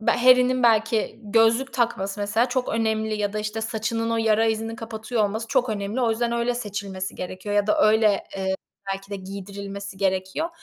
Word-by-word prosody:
be 220 - +2
Harry'nin, 255 0 +5
belki, 225 0 +2
gözlük 225 +5 +3
takması, 205 -5 -1
mesela, 220 +4 +2
çok 250 0 -1
önemli 220 -1 0
ya 205 -1 -1
da, 215 - -2
işte, 215 +1 -3
saçının 225 +1 -2
o 230 - +1
yara 225 0 +3
izini 225 +1 -1
kapatıyor 220 0 -2
olması 220 +3 -2
çok 260 -3 +2
önemli. 210 +3 -2
O 235 -2 +2
yüzden 235 +1 0
öyle 235 +1 0
seçilmesi 200 -4 -4
gerekiyor 185 +3 -5
ya 205 0 +3
da 210 - +3
öyle, 215 -2 +3
eee, 190 0 -1 0.4
belki 195 +1 -7
de, 200 - -3
giydirilmesi 200 +1 -7
gerekiyor. 190 - 0
220 Hz, 180 wpm, -24 LUFS, 200-230 Hz, 0.4 s, Harry'nin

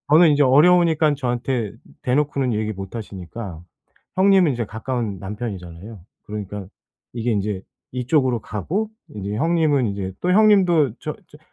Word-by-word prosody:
저는 165 +2 +8
이제 145 0 +4
어려우니깐 160 +2 +5
저한테 125 -4 -2 0.3
대놓고는 135 -1 +1
얘기 110 0 -1
못 95 +2 -8
하시니까 95 -3 -7 0.5
형님은 190 -5 +5
이제 115 -2 -3
가까운 110 -2 -3
남편이잖아요. 100 -1 -7 0.3
그러니까 105 -2 -6 0.5
이게 120 0 -1
인제 100 -2 -2 0.3
이쪽으로 130 -1 +1
가고. 180 - -3 0.2
인제 105 0 -5
형님은 155 -2 +2
이제 100 -1 -4
또 180 - 0
형님도 185 - +4
저 150 - -4
저 150 - -16
120 Hz, 335 characters per minute, -22 LUFS, 105-155 Hz, 0.5 s, 저는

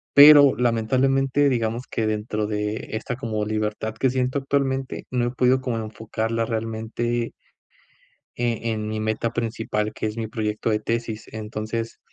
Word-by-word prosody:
Pero, 145 -1 +9
lamentablemente, 130 +4 +2
digamos 120 0 -1
que 110 - -1
dentro 105 0 -1
de 105 +1 -3
esta, 110 +3 -3
como 110 -4 -2
libertad 110 +1 -2
que 130 +2 +1
siento 130 +1 0
actualmente, 135 -1 -1
no 125 -1 0
he 120 - -1
podido 125 +1 +3
como 125 -3 -2
enfocarla 110 +1 -2
realmente 115 +1 -2 1.0
eh, 115 -1 -1
en 110 -1 -3
mi 110 0 -2
meta 110 +1 -1
principal, 110 -2 -2
que 110 - -2
es 105 +1 -5
mi 115 -1 -2
proyecto 110 0 -2
de 105 - +1
tesis. 115 0 -3
Entonces, 110 +1 -4
115 Hz, 150 wpm, -24 LUFS, 110-125 Hz, 1.0 s, Pero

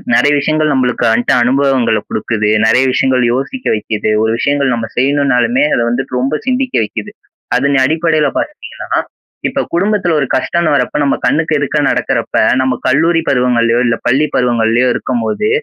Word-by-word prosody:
நெறைய 145 - +3
விஷயங்கள் 155 +1 0
நம்பளுக்கு 125 -3 0
வந்துட்டு 115 +2 +1
அனுபவங்கள 135 0 +1
குடுக்குது. 110 -2 -2 0.2
நெறைய 115 +4 +3
விஷயங்கள் 130 0 +1
யோசிக்க 195 - -4
வைக்குது. 110 0 -2
ஒரு 110 - +1
விஷயங்கள் 140 0 0
நம்ம 115 -1 -4
செய்யணும்னாலுமே 130 -2 +1
அத - - +1
வந்துட்டு 125 +1 -2
ரொம்ப 135 +4 -1
சிந்திக்க 260 0 -1
வைக்குது. 105 - -6 0.5
அதன் 140 +2 +1
அடிப்படையில 155 0 +1
பாத்தீங்கன்னா 300 - -6 0.6
இப்ப - - -3
குடும்பத்துல 190 -1 +1
ஒரு 140 - 0
கஷ்டம்ன்னு 170 -3 0
வரப்ப 140 +1 0
நம்ம 140 - +1
கண்ணுக்கு 155 +4 +1
எதிர்க்க 145 +1 -1
நடக்குறப்ப, - - -1 0.2
நம்ம 130 0 +1
கல்லூரி 165 +5 +2
பருவங்கள்ளயோ 120 -2 +2
இல்ல, 115 - +1
பள்ளி 135 +5 +2
பருவங்கள்ளயோ 120 0 +1
இருக்கும்போது 120 - -2
135 Hz, 145 wpm, -14 LUFS, 120-155 Hz, 0.6 s, நெறைய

